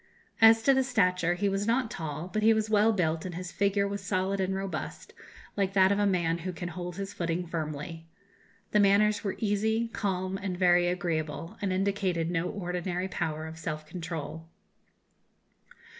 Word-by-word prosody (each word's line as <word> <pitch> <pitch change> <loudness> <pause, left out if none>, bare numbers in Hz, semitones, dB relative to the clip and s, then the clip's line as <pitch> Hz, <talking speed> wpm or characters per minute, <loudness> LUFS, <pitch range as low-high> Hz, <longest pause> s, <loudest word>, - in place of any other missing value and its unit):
As 225 0 +7
to 265 0 +4
stature, 180 -8 +2
he 200 +3 0
was 195 +1 -1
not 235 0 +1
tall, 160 -5 -5
but 215 +4 -2
he 220 +1 +5
was 220 0 -1
well 215 +1 +5
built, 165 -6 0
and 180 -2 -5
his 180 +1 -5
figure 200 0 +1
was 200 0 -4
solid 190 0 0
and 190 0 0
robust, 195 0 -5 0.4
like 195 -2 0
that 190 -1 +5
of 200 - +2
a 205 - +3
man 170 -3 +1
who 185 +2 -4
can 175 0 -5
hold 175 +1 -6
his 195 0 -5
footing 175 -1 -2
firmly. 165 0 -5 0.6
The 210 - +4
manners 205 +1 +4
were 195 - -2
easy, 220 +2 0
calm, 190 -3 -2
and 190 -2 -3
very 175 -1 +4
agreeable, 170 0 -2
and 200 -2 0
indicated 185 -3 0
no 175 0 0
ordinary 180 -1 -3
power 160 -3 -3
of 160 0 -8
self 155 -1 -4
control. 165 -1 -6
185 Hz, 175 wpm, -29 LUFS, 170-200 Hz, 0.6 s, As